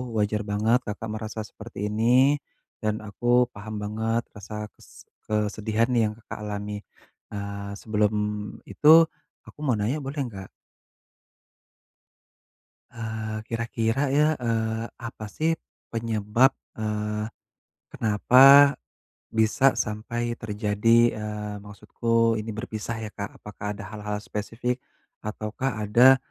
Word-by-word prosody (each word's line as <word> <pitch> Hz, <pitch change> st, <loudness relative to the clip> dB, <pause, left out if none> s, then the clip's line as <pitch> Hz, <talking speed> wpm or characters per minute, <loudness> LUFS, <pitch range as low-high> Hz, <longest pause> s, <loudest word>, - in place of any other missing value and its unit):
wajar 105 Hz, 0 st, 0 dB
banget 110 Hz, +4 st, +2 dB
Kakak 105 Hz, +1 st, -4 dB
merasa 110 Hz, 0 st, -4 dB
seperti 105 Hz, 0 st, -6 dB
ini, 125 Hz, +6 st, +4 dB, 0.4 s
dan 110 Hz, -1 st, -2 dB
aku 120 Hz, +4 st, +2 dB
paham 110 Hz, +1 st, -7 dB
banget 110 Hz, +2 st, -1 dB
rasa 105 Hz, +1 st, -7 dB
kes -, -, -17 dB, 0.2 s
kesedihan 110 Hz, +2 st, 0 dB
yang 110 Hz, -3 st, +2 dB
Kakak 110 Hz, -2 st, -9 dB
alami. 105 Hz, 0 st, -4 dB, 0.6 s
Eee, 100 Hz, 0 st, -5 dB
sebelum 105 Hz, 0 st, 0 dB, 0.5 s
itu 160 Hz, +2 st, +7 dB, 0.4 s
aku -, -, -16 dB
mau 135 Hz, -6 st, +1 dB
nanya 110 Hz, +9 st, 0 dB
boleh 140 Hz, +1 st, -3 dB
nggak? 100 Hz, -6 st, -7 dB, 2.4 s
Eee, 110 Hz, -1 st, -4 dB
kira-kira 115 Hz, +2 st, -1 dB
ya, 150 Hz, +2 st, +4 dB, 0.2 s
eee, 115 Hz, -1 st, 0 dB
apa 115 Hz, -2 st, -7 dB
sih 160 Hz, +8 st, +1 dB, 0.4 s
penyebab, 115 Hz, +2 st, +2 dB, 0.3 s
eee, 105 Hz, 0 st, -2 dB, 0.7 s
kenapa 135 Hz, +6 st, +7 dB, 0.6 s
bisa 110 Hz, +4 st, +3 dB
sampai 120 Hz, +3 st, -2 dB
terjadi, 110 Hz, +2 st, +2 dB
eee, 105 Hz, -1 st, -4 dB
maksudku 115 Hz, +2 st, 0 dB
ini 110 Hz, +1 st, -5 dB
berpisah 110 Hz, +1 st, -4 dB
ya, 105 Hz, -, -5 dB
Kak. 100 Hz, -1 st, -6 dB
Apakah 105 Hz, 0 st, -6 dB
ada 110 Hz, -, -7 dB
hal-hal 105 Hz, -1 st, -4 dB
spesifik 115 Hz, +4 st, -3 dB, 0.4 s
ataukah 110 Hz, +3 st, -3 dB
ada 125 Hz, +5 st, +7 dB
110 Hz, 110 wpm, -26 LUFS, 105-120 Hz, 2.4 s, itu